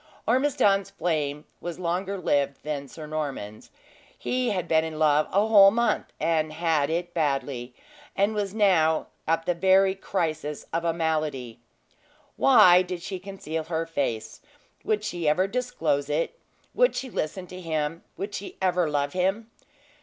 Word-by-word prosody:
Ormiston's 230 -6 +2
flame 150 -3 -2
was 175 -1 -6
longer 185 +3 -2
lived 140 -6 0
than 145 -2 -4
Sir 155 +3 -9
Norman's; 140 -9 -5 0.5
he 250 -1 -1
had 190 -4 -2
been 160 -1 +3
in 160 -1 -5
love 155 -1 +3
a 200 +3 +3
whole 205 -3 +8
month, 230 +1 0
and 155 -1 +1
had 155 -3 +1
it 175 +1 -2
badly, 135 -5 -2 0.4
and 200 +2 +2
was 205 -2 -2
now 180 -7 +3 0.2
at 165 +1 +1
the 180 - +1
very 190 +2 +4
crisis 155 -6 -3
of 165 +1 0
a 170 - +2
malady. 155 -8 -2 0.8
Why 175 +7 +7
did 180 -1 -5
she 190 -1 -5
conceal 170 -5 -5
her 165 0 -2
face 140 -9 -3 0.4
would 210 -1 0
she 175 -6 -1
ever 180 +5 +3
disclose 180 - -1
it 165 - -1 0.3
would - - +3
she 260 -2 -4
listen 180 +2 -3
to 180 +1 -10
him 160 -1 -2
would 200 +1 -5
she 200 - -7
ever 180 -3 +1
love 145 -1 -1
him? 195 +5 -1
165 Hz, 155 wpm, -26 LUFS, 150-195 Hz, 0.8 s, whole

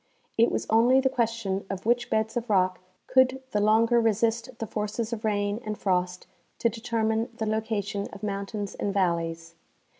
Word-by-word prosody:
It 230 +1 +4
was - - -1
only 235 +4 +5
the 265 0 +1
question 230 -5 -1
of 195 0 -5
which 240 +1 +2
beds 220 +2 0
of 240 -1 -3
rock 185 -2 +2 0.3
could 260 0 +3
the 210 - +1
longer 225 +3 +4
resist 230 +2 0
the 225 - -3
forces 215 +2 -3
of 225 -1 -5
rain 205 0 0
and 215 -1 -4
frost 180 -1 -1 0.3
to 235 - +2
determine 225 -1 -1
the 220 - -2
location 215 -2 -2
of 200 - -11
mountains 200 0 -3
and 200 - -2
valleys. 165 -3 -1
220 Hz, 170 wpm, -27 LUFS, 200-230 Hz, 0.3 s, only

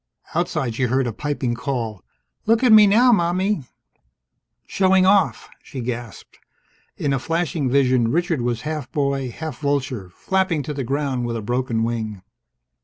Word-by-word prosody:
Outside, 120 -4 -1
she 125 +3 0
heard 130 +2 +1
a 120 - -3
piping 140 -2 -2
call: 120 -5 -4 0.4
"Look 225 +2 +3
at 250 - +5
me 215 -1 +9
now, 240 +5 +5
Mommie!" 185 - +1 1.0
"Showing 190 -1 +3
off!" 195 +1 +3
she 135 - -9
gasped. 120 -1 -6 0.6
In 140 -2 0
a 135 - 0
flashing 165 -2 -1
vision, 130 -3 +3
Richard 170 0 0
was 120 -1 -1
half 150 -2 -5
boy, 140 -2 -1
half 155 +2 -7
vulture, 130 -9 -2
flapping 185 - -1
to 150 - -4
the 140 -2 -3
ground 135 -1 -1
with 115 -1 -2
a - - -4
broken 120 0 -1
wing. 110 -4 -3
135 Hz, 155 wpm, -22 LUFS, 120-170 Hz, 1.0 s, me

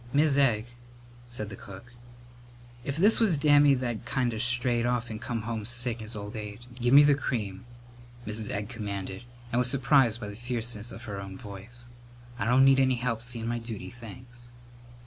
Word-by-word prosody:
"Mis' 145 0 +3
Egg," 120 -6 +3 0.6
said 110 -3 -5
the - - -6
cook, 100 +6 -12 0.9
"if 140 +2 -3
this 205 +6 +5
was 205 -9 +3
Dammy 145 -1 +5
that'd 120 -3 -3
kind 125 -3 -1
of 110 - -2
strayed 125 -1 +2
off 120 -1 -1
and 110 0 -6
come 115 -2 -3
home 110 -1 -3
sick 120 +1 +1
in 110 - -8
his 110 - -5
old 105 0 -6
age 105 +2 -7
" - - -14
"Give 120 +1 +2
me 145 +2 +9
the 145 0 +5
cream," 110 -8 -3 0.6
Mrs. 110 -1 -3
Egg 100 +1 -3
commanded, 100 -2 -5 0.3
and 120 - +1
was 125 0 +3
surprised 130 -3 +3
by 105 - -6
the 100 - -8
fierceness 120 -1 -4
of 115 - -10
her 100 -4 -5
own 95 -1 -8
voice. 120 +3 -9 0.5
"I - - -1
don't 125 +3 +5
need 135 0 +6
any 130 -1 +3
help 120 -2 -2
seein' 120 -1 -4
my 120 0 -1
duty, 115 -1 -7
thanks!" 120 +1 -11
120 Hz, 195 wpm, -28 LUFS, 110-125 Hz, 0.9 s, me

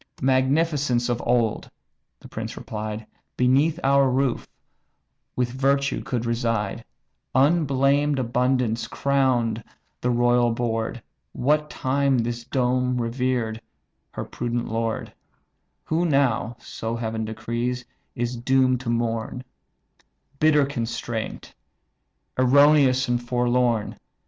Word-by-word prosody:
"Magnificence 135 -1 +2
of 120 -1 -1
old 120 -3 +1 0.5
(the - - -13
prince - - -6
replied) 110 0 -5 0.3
Beneath 140 +6 +3
our 140 0 +4
roof 130 -1 0 0.9
with 125 -1 0
virtue 140 +2 +1
could 120 -2 -3
reside; 115 -2 -1 0.5
Unblamed 140 -1 +3
abundance 125 -2 0
crowned 125 -5 +1 0.4
the 125 - 0
royal 120 0 +3
board, 115 0 -2 0.3
What 150 +3 +1
time 135 0 +1
this 120 0 -2
dome 125 0 0
revered 120 -1 -1 0.5
her - - -4
prudent 120 0 -3
lord; 115 0 -2 0.7
Who 160 +2 0
now 125 -5 +1
(so 115 +1 -5
Heaven 110 -1 -3
decrees) 120 +3 -3 0.3
is 120 +1 -2
doom'd 130 +1 +2
to 130 -2 -5
mourn, 115 +1 -2 1.0
Bitter 150 -2 +4
constraint, 115 -4 -4 0.9
erroneous 135 0 +5
and 120 0 0
forlorn. 120 -2 0
125 Hz, 100 wpm, -24 LUFS, 115-135 Hz, 1.0 s, erroneous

